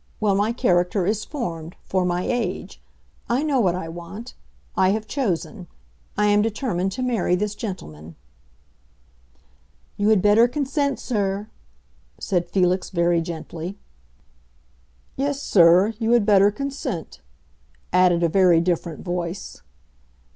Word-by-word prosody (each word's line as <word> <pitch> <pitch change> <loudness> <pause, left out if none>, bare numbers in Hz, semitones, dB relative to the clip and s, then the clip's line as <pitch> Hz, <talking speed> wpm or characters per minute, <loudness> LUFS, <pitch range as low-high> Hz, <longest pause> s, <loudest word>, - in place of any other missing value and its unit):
Well, 210 -2 +2
my 205 +3 +1
character 180 -3 +1
is 215 +2 0
formed—for 180 - -4
my 180 0 0
age. 245 -1 -3 0.5
I 245 +5 +1
know 290 -4 +1
what 185 -6 +2
I 180 -3 -5
want; 175 +8 -9 0.4
I 185 - +3
have 215 0 -3
chosen. 210 - -3 0.5
I 210 - +3
am 205 0 +4
determined 210 -4 -1
to 255 - -3
marry 230 -8 +1
this 205 +2 -2
gentleman." 85 - -7 1.8
"You 205 +1 +2
had 210 -4 +4
better 210 +3 +6
consent, 280 +1 -1
sir," 205 -2 -2 0.7
said 175 -3 -1
Felix 185 -1 +1
very 170 -1 +2
gently. 170 +3 -6 1.4
"Yes, 280 +1 -1
sir, 185 -1 +5
you 230 0 +2
had 235 -4 +4
better 200 -1 +5
consent," 265 - -5 0.7
added 180 -1 +4
a - - +4
very 180 -1 +4
different 170 -2 -2
voice. 175 +1 -4
195 Hz, 125 wpm, -23 LUFS, 175-225 Hz, 1.8 s, better